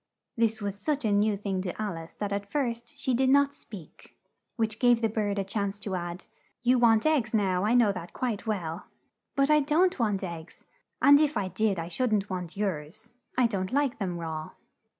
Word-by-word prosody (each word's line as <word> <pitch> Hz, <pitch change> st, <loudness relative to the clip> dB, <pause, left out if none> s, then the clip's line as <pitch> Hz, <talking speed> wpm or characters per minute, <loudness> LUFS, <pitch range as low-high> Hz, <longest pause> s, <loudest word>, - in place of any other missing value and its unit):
This 225 Hz, -2 st, 0 dB
was 200 Hz, 0 st, -3 dB
such 290 Hz, +3 st, -1 dB
a 215 Hz, -, +2 dB
new 205 Hz, 0 st, +2 dB
thing 195 Hz, -2 st, -2 dB
to 185 Hz, +1 st, -5 dB
Al 210 Hz, -4 st, -2 dB
ice 165 Hz, 0 st, -9 dB
that 205 Hz, -1 st, -3 dB
at 200 Hz, 0 st, -4 dB
first, 245 Hz, 0 st, -3 dB
she 265 Hz, -2 st, -1 dB
did 260 Hz, +2 st, +2 dB
not 280 Hz, +1 st, +4 dB
speak, 200 Hz, -, -12 dB, 0.4 s
which 220 Hz, -2 st, -1 dB
gave 245 Hz, -2 st, +5 dB
the 230 Hz, -, +2 dB
bird 205 Hz, -2 st, -1 dB
a 200 Hz, -, +1 dB
chance 200 Hz, 0 st, -2 dB
to 205 Hz, -1 st, -5 dB
add, 175 Hz, 0 st, -4 dB, 0.4 s
"You 250 Hz, +1 st, +4 dB
want 225 Hz, -2 st, +4 dB
eggs 265 Hz, -8 st, +2 dB
now, 190 Hz, -2 st, +1 dB
I 225 Hz, +3 st, +3 dB
know 235 Hz, -4 st, +5 dB
that 180 Hz, -3 st, -7 dB
quite 230 Hz, -4 st, -3 dB
well." 175 Hz, -5 st, -3 dB, 0.5 s
"But 275 Hz, +2 st, +3 dB
I 300 Hz, -, +6 dB
don't 315 Hz, +5 st, +2 dB
want 205 Hz, -4 st, 0 dB
eggs, 170 Hz, -3 st, -8 dB, 0.4 s
and 285 Hz, 0 st, +8 dB
if 305 Hz, -1 st, +2 dB
I 190 Hz, -, -1 dB
did 200 Hz, +2 st, 0 dB
I 165 Hz, 0 st, -3 dB
should 250 Hz, +7 st, -1 dB
n't 205 Hz, -1 st, -2 dB
want 180 Hz, -1 st, -5 dB
yours. 195 Hz, +3 st, -4 dB, 0.3 s
I 250 Hz, -, +5 dB
don't 195 Hz, -5 st, -1 dB
like 280 Hz, -3 st, 0 dB
them 180 Hz, -4 st, -2 dB
raw." 160 Hz, -2 st, -5 dB
210 Hz, 210 wpm, -28 LUFS, 190-245 Hz, 0.5 s, and